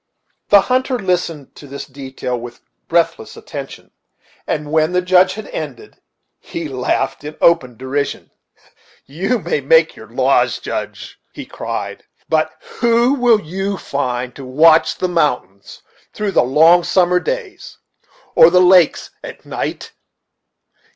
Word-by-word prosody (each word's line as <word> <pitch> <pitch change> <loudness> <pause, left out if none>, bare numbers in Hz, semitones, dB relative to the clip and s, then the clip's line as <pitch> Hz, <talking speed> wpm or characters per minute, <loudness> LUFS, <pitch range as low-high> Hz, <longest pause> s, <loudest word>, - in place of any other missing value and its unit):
The 200 -1 +7
hunter 255 +3 0
listened 180 - -2
to 145 - -12
this 140 +1 -7
detail 130 -2 -6
with 120 0 -9 0.3
breathless 170 0 -1
attention, - - -9 0.6
and, 150 0 -3
when 160 +2 +2
the 180 - +2
Judge 185 +1 +3
had 215 -1 -8
ended, 145 -6 -8 0.4
he 165 -2 -6
laughed 135 +1 -2
in 150 +1 -8
open 130 -9 +2
derision. 135 +2 -4 0.7
"You 190 - -1
may 470 - -2
make 485 0 +3
your - - -13
laws, - - +1
Judge," - - -6
he - - -8
cried, - - -6 0.2
"but - - +1 0.3
who 235 +2 +3
will 240 -5 +3
you 195 +4 -4
find 125 -5 -3
to 140 - -9
watch 155 +5 +4
the 185 - -1
mountains 135 - -2 0.3
through 210 -1 -2
the - - +3
long 160 +7 +5
summer 180 0 +2
days, 410 - -6 0.6
or 165 - +7
the 180 +1 +4
lakes 180 -2 +4
at - - -10
night? - - -5
170 Hz, 135 wpm, -17 LUFS, 140-195 Hz, 0.7 s, The